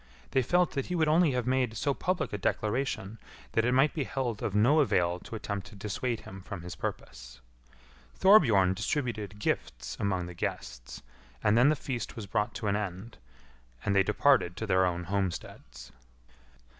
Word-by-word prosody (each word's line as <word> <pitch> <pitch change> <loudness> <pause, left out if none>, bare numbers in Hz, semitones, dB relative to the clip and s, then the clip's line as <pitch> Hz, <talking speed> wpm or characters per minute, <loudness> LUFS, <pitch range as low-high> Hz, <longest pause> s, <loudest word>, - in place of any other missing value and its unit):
They 130 - +3
felt 175 +7 +2
that 135 -2 -3
he 180 - -2
would 160 -2 +2
only 160 -1 +4
have 125 -2 -1
made 125 -3 0
so 140 +5 +1
public 180 - -2
a - - -1
declaration 110 0 -2 0.3
that 115 - +2
it 125 - +2
might 135 +4 +4
be 150 - -1
held 120 -6 -3
of 100 - -2
no 125 +9 +5
avail 90 - +2
to 115 - -9
attempt 100 -3 -4
to 110 - -13
dissuade 110 +4 -3
him 95 0 -10
from 95 -2 -7
his 90 - -6
purpose. - - -7 0.8
Thorbjorn 115 - +6
distributed 110 -3 -3
gifts 60 -10 -3
among 95 -3 0
the 90 - -8
guests, 60 -6 -5 0.4
and 105 - +4
then 125 +4 +6
the 155 - +3
feast 130 -4 -5
was 110 - -6
brought 105 +2 -1
to 115 - -5
an 100 - +2
end, 105 +2 -5 0.7
and 100 - +1
they 100 - +6
departed 105 -2 +2
to 110 - -3
their 95 -2 +3
own 90 0 -2
homesteads. 85 -10 -4
105 Hz, 180 wpm, -29 LUFS, 95-130 Hz, 0.8 s, Thorbjorn